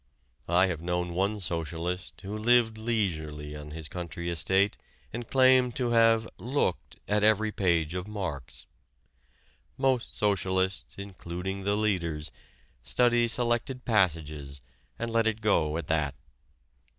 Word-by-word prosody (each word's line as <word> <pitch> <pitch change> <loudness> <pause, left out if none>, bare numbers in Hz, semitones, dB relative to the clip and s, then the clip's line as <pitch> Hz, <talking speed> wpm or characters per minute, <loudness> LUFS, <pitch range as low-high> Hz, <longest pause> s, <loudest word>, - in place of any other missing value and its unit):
I 90 +2 +5
have 85 -4 -3
known 90 0 -2
one 100 +4 0
socialist 85 +1 -3
who 100 +2 -5
lived 115 0 +3
leisurely 80 -10 -2
on 75 0 -8
his 80 0 -5
country 85 0 -5
estate 95 +4 +3 0.4
and 120 0 -5
claimed 130 -2 +5
to 125 -2 0
have 115 -1 +4
"looked" 125 -7 -1
at 105 0 +2
every 110 0 +4
page 85 -5 +1
of 90 +1 -4
Marx. 90 - -5 1.1
Most 130 -3 0
socialists, 95 -2 0
including 95 0 -5
the 100 +1 +1
leaders, 85 -8 -1 0.5
study 120 - +3
selected 120 +2 0
passages 75 - 0 0.4
and 115 0 -3
let 115 -1 +2
it 110 0 0
go 85 -8 +2
at 85 - -4
that. 75 -4 0
95 Hz, 125 wpm, -28 LUFS, 85-110 Hz, 1.1 s, I